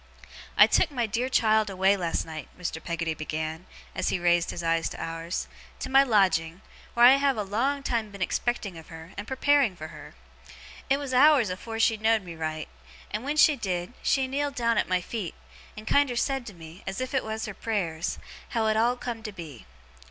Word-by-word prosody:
'I - - +10
took 345 - +3
my 250 -5 -1
dear 235 +4 -1
child 220 -4 +3
away 190 +1 +3
last 175 -4 -2
night,' 160 -1 -7
Mr. 170 -3 -5
Peggotty 165 -1 -2
began, 155 +2 -5 0.3
as - - -1
he - - 0
raised 175 -1 +2
his 170 - -5
eyes 165 0 +1
to - - -9
ours, 165 +2 -4 0.3
'to - - -6
my 270 +1 +7
lodging, 185 -8 +2 0.3
wheer 240 0 +7
I 250 - +10
have 275 -2 +1
a 210 - 0
long 260 +8 -1
time 230 -5 -1
been 200 -1 -11
expecting 200 -2 -2
of 160 - -14
her 165 +1 -11
and 205 +2 -6
preparing 270 -5 +2
fur 155 -2 -8
her. 155 -2 -12 0.7
It 275 - +4
was 280 -2 -5
hours 260 -5 +5
afore 225 +5 -6
she 225 0 +3
knowed 220 0 +2
me 175 -2 -8
right; 155 -1 -4 0.4
and 210 +3 -3
when 290 +3 -2
she 305 0 +6
did, 185 -3 -3
she 270 -1 +2
kneeled 280 +1 -2
down 230 -3 +2
at - - -1
my 185 -1 +2
feet, 200 -1 -5 0.4
and 215 - -8
kiender 275 -1 +2
said 270 -1 -1
to 210 - -8
me, 165 +1 -12
as 190 +3 -3
if 255 +1 -4
it 265 - +1
was 220 0 -4
her 210 - -6
prayers, 180 -7 -2 0.3
how 230 -3 0
it 215 0 +2
all 235 +3 +3
come 240 -2 -5
to 215 -1 -6
be. 160 - -10
215 Hz, 210 wpm, -27 LUFS, 170-245 Hz, 0.7 s, I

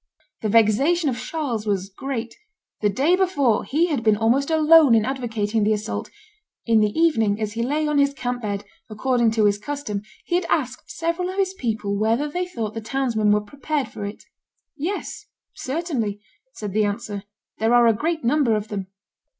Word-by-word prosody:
The 215 - -1
vexation 270 - +3
of 240 - -4
Charles 250 -6 -3
was 195 -2 0
great; 235 +1 -5 0.5
the 210 - +3
day 280 - +3
before 290 - +2
he 315 +5 +1
had 295 -8 -1
been 215 -2 +3
almost 240 +6 +2
alone 315 -4 +6
in 220 -1 +3
advocating 225 -5 -1
the 215 +1 +3
assault; 215 +1 -4 0.6
in 225 -2 +4
the 210 -1 +3
evening, 225 -11 +3
as 215 -1 -2
he 230 - -2
lay 295 +5 0
on 300 -1 +2
his 280 0 +4
camp 245 -2 -3
bed, 205 -2 -3 0.2
according 235 +2 +1
to 220 -2 +3
his 205 0 +2
custom, 215 -4 -4 0.2
he - - -5
had 350 0 +1
asked 255 -5 -1
several 335 +2 -2
of 375 - -6
his 385 -1 +1
people 220 - -2
whether 225 +7 +1
they 355 +4 -3
thought 225 -11 -4
the 225 - -5
townsmen 230 -3 0
were 210 0 +3
prepared 285 +6 -3
for - - -7
it. 200 +1 -6 0.5
"Yes, 390 +6 -4 0.3
certainly," 260 - -3 0.4
was 210 -2 -4
the 215 +2 +2
answer; 205 0 -3 0.4
"there 225 +3 +3
are 240 0 +6
a 230 - +5
great 320 +7 -2
number 245 -2 +3
of 210 0 -3
them." 195 -3 -4
235 Hz, 185 wpm, -23 LUFS, 215-300 Hz, 0.6 s, alone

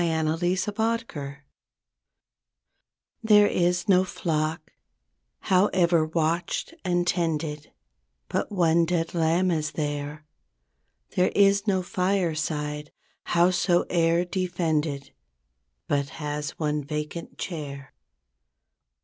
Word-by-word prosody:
32 165 +2 +1
TO 190 +2 -1
A 225 +2 +1
FRIEND 140 -7 -7 1.8
There 210 -2 +6
is 180 0 +1
no 185 -2 +5
flock, 155 -3 -2 0.7
however 180 -3 +3
watched 165 - -1
and 175 -2 +1
tended, 160 -4 -1 0.6
But - - -2
one 170 -3 +3
dead 165 -1 -1
lamb 170 +2 +2
is 155 -2 -1
there. 145 0 -4 0.9
There 185 - +3
is 200 +1 +4
no 190 -2 +2
fireside, 160 -5 -1 0.3
howsoe'er 175 -1 +2
defended, 165 -6 -1 0.8
But 140 -1 0
has 150 -1 -4
one 150 -2 -1
vacant 150 +3 -5
chair. 140 -6 -6
165 Hz, 90 wpm, -26 LUFS, 150-180 Hz, 1.8 s, There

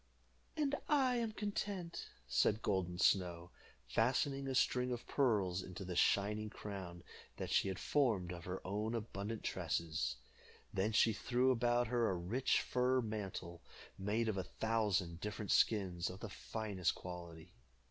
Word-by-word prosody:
"And 290 -2 +1 0.2
I 265 -4 +4
am 230 -2 0
content," 200 -4 -3 0.2
said 105 - +2
Golden 90 -3 0
Snow, 90 -2 +2 0.4
fastening 135 - +1
a 135 - -1
string 125 0 +2
of 120 -1 -3
pearls 100 -9 +2
into 95 +1 -7
the 90 -1 -4
shining 105 +4 +2
crown 95 -5 -7 0.3
that - - -4
she - - +3
had 95 -2 -2
formed 110 -12 +1
of 85 -1 -8
her 90 +1 -5
own 105 +4 -1
abundant 110 -1 -4
tresses. 80 -4 -1 0.6
Then 95 +3 +1
she 110 +1 +4
threw 125 +4 +2
about 120 0 +2
her 120 -1 +1
a 95 - 0
rich 100 +10 +1
fur 125 +1 +2
mantle, 100 -7 -4 0.3
made 105 +4 0
of 110 -3 0
a 95 - 0
thousand 100 -7 0
different 105 -1 -3
skins 95 -5 +2
of 95 +1 -8
the 115 - -5
finest 100 -3 -2
quality. 85 -1 -8
105 Hz, 145 wpm, -37 LUFS, 90-120 Hz, 0.6 s, I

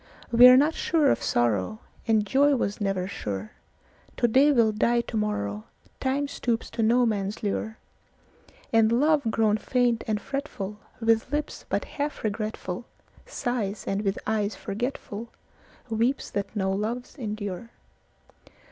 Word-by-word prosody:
We 240 +1 +9
are 250 0 +9
not 295 +4 +4
sure 310 -5 +2
of - - 0
sorrow, 120 - +1 0.3
And 220 -2 +3
joy 280 +6 +4
was 210 -4 -2
never 195 -2 0
sure; 105 - -5 0.7
To 240 - +3
day 270 +6 +5
will 230 -5 +4
die 235 +3 +2
to 235 - -8
morrowTime 210 - -3
stoops 235 -4 -2
to 230 - -2
no 240 +3 +4
man's 205 -2 -2
lure; 220 +2 -2 1.0
And 225 -1 +5
love, 295 +5 +3
grown 220 -1 +2
faint 245 0 +1
and 215 -1 0
fretfulWith 225 -3 -2
lips 295 0 -3
but - - -1
half 290 0 -4
regretfulSighs, 215 +1 -4
and 195 +1 -1
with 195 -1 -1
eyes 215 -1 0
forgetfulWeeps 230 +2 -4
that 200 +1 -3
no 190 -2 0
loves 220 +5 -3
endure. 210 - -5
220 Hz, 130 wpm, -26 LUFS, 205-250 Hz, 1.0 s, We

